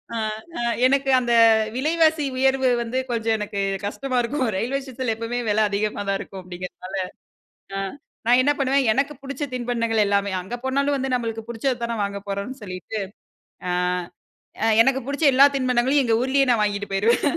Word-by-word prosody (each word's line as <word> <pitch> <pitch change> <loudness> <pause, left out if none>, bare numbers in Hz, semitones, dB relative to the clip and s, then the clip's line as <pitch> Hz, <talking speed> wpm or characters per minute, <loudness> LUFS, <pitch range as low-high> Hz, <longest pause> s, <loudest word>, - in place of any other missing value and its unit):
அ, - - -1 0.4
அ - - -3 0.3
எனக்கு 275 0 +1
அந்த 240 -1 -2 0.4
விலைவாசி 315 +2 +2
உயர்வு 265 0 +3
வந்து 235 +2 -3
கொஞ்சம் 225 -1 +1
எனக்கு 205 -1 -4 0.3
கஷ்டமா 255 +5 -2
இருக்கும் 260 +3 -1
ரெயில்வே 255 +7 -1
ஸ்டேஷன்ல 255 -3 -3
எப்பமே 230 +2 -3
வில 215 +1 +3
அதிகமா 205 +1 -1
தான் 195 - +1
இருக்கும் 195 - -8
அப்பிடிங்கிறதுனால. 180 +1 -8 0.8
அ - - -2 0.5
நான் 245 +1 +6
என்ன 285 +3 +3
பண்ணுவேன். 275 0 +2
எனக்கு 280 +3 0
புடிச்ச 275 +2 -5
தின்பண்டங்கள் 230 -3 0
எல்லாமே 200 0 +1
அங்க 190 +7 -6
போனாலும் 280 +2 +1
வந்து 265 0 -2
நம்மளுக்கு 225 -2 -3
புடிச்சது 240 +2 -1
தானே 235 0 -2
வாங்க 200 0 -3
போறோன்னு 200 +7 -4
சொல்லிட்டு, 185 +3 -5 0.7
ஆ, - - +1 0.9
அ - - +3 0.2
எனக்கு 265 +2 +1
புடிச்ச 285 +3 -3
எல்லா 270 +2 +8
தின்பண்டங்களையும் 255 +2 +2
எங்க 225 -1 +3
ஊர்லேயே 270 +1 +2
நான் 230 -3 +2
வாங்கிட்டு 205 0 -3
போயிருவேன் 220 +5 +2
240 Hz, 160 wpm, -23 LUFS, 210-270 Hz, 0.9 s, எல்லா